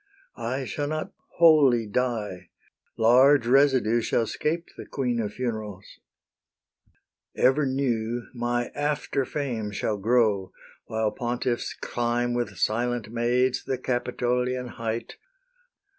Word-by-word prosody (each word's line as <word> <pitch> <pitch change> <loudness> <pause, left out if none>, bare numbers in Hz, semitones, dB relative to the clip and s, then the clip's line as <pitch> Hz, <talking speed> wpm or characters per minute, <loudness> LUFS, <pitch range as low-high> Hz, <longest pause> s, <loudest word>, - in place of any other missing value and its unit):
I 130 +4 -2
shall 145 +3 -3
not 155 +1 -3 0.3
wholly 145 -8 +6
die: 105 -5 -2 0.5
large 125 +3 +5
residue 130 -3 +4
Shall 115 - +1
'scape 165 +8 -2
the - - -9
queen 125 -4 -1
of 105 -2 -2
funerals. 110 -6 -5 1.4
Ever 140 +2 +3
new 120 -3 -1
My 120 0 -1
after 145 -2 -1
fame 120 -7 -3
shall 105 +1 -2
grow, 105 -2 +1 0.3
while 110 -1 -1
pontiffs 120 0 -2
climb 120 0 -1
With 120 -5 -2
silent 120 +1 -1
maids 125 +2 +1
the 130 - -2
Capitolian 125 0 -1
height. 115 0 -5
120 Hz, 110 wpm, -26 LUFS, 115-130 Hz, 1.4 s, wholly